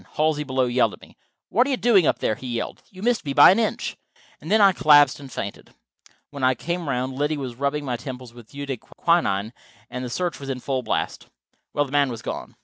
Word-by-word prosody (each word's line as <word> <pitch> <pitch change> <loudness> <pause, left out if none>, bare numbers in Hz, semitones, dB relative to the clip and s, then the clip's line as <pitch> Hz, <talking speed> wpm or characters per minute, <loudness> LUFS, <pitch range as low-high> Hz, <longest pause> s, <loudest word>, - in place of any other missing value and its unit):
Halsey, 155 -1 +1
below, 130 -2 0
yelled 120 -3 +2
at - - -13
me. - - -17 0.3
"What 245 +6 +3
are - - -2
you 265 - +1
doing 205 -11 +4
up - - +2
there?" - - 0
he 130 - -8
yelled. 120 -1 -4
"You 190 0 -11
missed 240 0 +1
me 140 - -3
by - - +9
an 195 - +2
inch." 225 - -1 0.4
And - - -10
then 220 - +4
I 200 -2 +7
collapsed 145 -6 +5
and 135 -2 -11
fainted. 100 0 -7 0.6
When 140 -2 -7
I 130 0 +4
came 170 +3 -4
around 130 0 -1
Liddy 145 +3 -1
was 130 -4 -5
rubbing 140 +3 -2
my 125 -3 -2
temples 125 -1 -8
with 120 -2 -14
eau 140 0 -5
de 135 -2 -3
quinine, 110 - 0 0.4
and 125 +1 -5
the 125 - -4
search 175 +5 -2
was 135 -1 -7
in 130 -1 -3
full 130 0 -2
blast. - - -3 0.4
Well, 145 - +1
the 135 - -12
man 145 -1 +3
was 115 -3 -7
gone. - - -6
140 Hz, 235 wpm, -23 LUFS, 125-155 Hz, 0.6 s, by